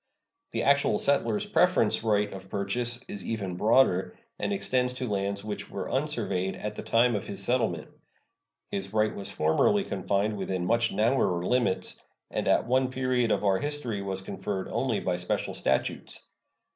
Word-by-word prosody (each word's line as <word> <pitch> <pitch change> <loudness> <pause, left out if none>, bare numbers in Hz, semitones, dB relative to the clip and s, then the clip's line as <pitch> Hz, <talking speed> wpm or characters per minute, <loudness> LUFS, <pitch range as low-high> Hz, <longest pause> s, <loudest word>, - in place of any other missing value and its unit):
The - - -2
actual 140 -6 +3
settler's 140 - +1
preference 180 - +3
right 105 -2 +1
of 95 0 -10
purchase 120 +5 0
is 100 - -6
even 100 -5 -3
broader, 105 -2 +3 0.2
and - - -1
extends 125 -10 0
to 125 0 -3
lands 100 -1 -1
which 105 -1 -5
were - - -5
unsurveyed 95 +1 -1
at 105 0 -5
the - - -6
time 120 +1 +3
of 105 - -3
his - - 0
settlement. - - 0 0.8
His 100 +1 -4
right 110 0 +2
was 100 - -3
formerly 80 - +2
confined 100 - -1
within 95 -2 -2
much 115 +3 +2
narrower 105 -7 +1
limits, 120 -4 0 0.3
and - - -2
at - - +3
one 130 +2 +2
period 130 -2 0
of - - +1
our 95 -1 +3
history 145 -8 -2
was 95 -1 -2
conferred 95 0 -4
only 125 -5 0
by 90 -1 -1
special 90 0 -2
statutes. 65 0 -1
105 Hz, 160 wpm, -28 LUFS, 95-125 Hz, 0.8 s, actual